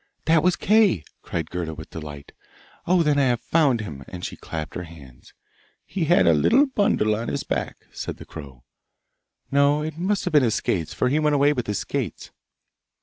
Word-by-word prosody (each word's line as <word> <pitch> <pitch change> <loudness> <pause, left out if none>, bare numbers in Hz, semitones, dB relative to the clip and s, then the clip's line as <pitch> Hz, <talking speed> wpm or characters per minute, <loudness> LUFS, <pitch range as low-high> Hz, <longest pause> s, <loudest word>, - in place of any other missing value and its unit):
'That 160 0 +4
was 180 +2 +3
Kay!' 210 - +3 0.2
cried 80 -2 -4
Gerda 85 -3 -4
with 80 +1 -10
delight. 75 -3 -8 0.6
'Oh, 180 -1 +4
then 150 -2 +2
I 140 - +4
have 120 -2 +1
found 135 -3 +2
him!' 70 -10 -7
and 90 -1 -7
she - - -5
clapped 80 -1 -6
her 90 - -5
hands. 70 -7 -15 0.5
'He 180 -3 -2
had 160 - +4
a 85 - +6
little 245 - +4
bundle 200 - +1
on 115 +2 -4
his - - -2
back,' - - -4
said - - -6
the - - -11
crow. 70 -5 -11 0.9
'No, 140 +2 +3
it 160 +1 -5
must 195 +3 0
have 180 - -2
been 150 - +6
his 115 -4 +1
skates, 80 -4 -1
for 125 - 0
he 145 +4 +2
went 150 -1 +2
away 145 +1 +4
with 125 -4 -3
his 105 -2 -1
skates! - - -4
125 Hz, 200 wpm, -24 LUFS, -, 0.9 s, a